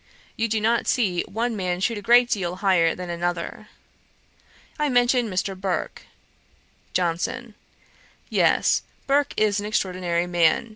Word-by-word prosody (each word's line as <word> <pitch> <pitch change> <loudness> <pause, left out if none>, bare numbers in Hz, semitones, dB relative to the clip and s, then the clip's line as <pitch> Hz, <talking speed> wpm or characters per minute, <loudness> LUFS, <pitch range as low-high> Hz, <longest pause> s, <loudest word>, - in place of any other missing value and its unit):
You 230 -1 0
do 220 0 0
not 230 +2 +1
see 190 -8 +1
one 230 +3 -2
man 180 -3 -2
shoot 220 +3 -1
a - - -10
great 240 +3 +5
deal 180 -6 -2
higher 185 -4 +2
than 180 -1 -6
another.' 175 +4 -4 1.1
I 300 -1 +1
mentioned 245 -2 +2
Mr. 190 +1 -2
Burke. 185 -3 -4 0.9
JOHNSON. 180 +7 -2 0.7
'Yes; - - +2 0.2
Burke 285 +1 +1
is 210 -1 +2
an 205 - -4
extraordinary 180 -4 -1
man. 175 +4 +2
195 Hz, 135 wpm, -24 LUFS, 175-230 Hz, 1.1 s, great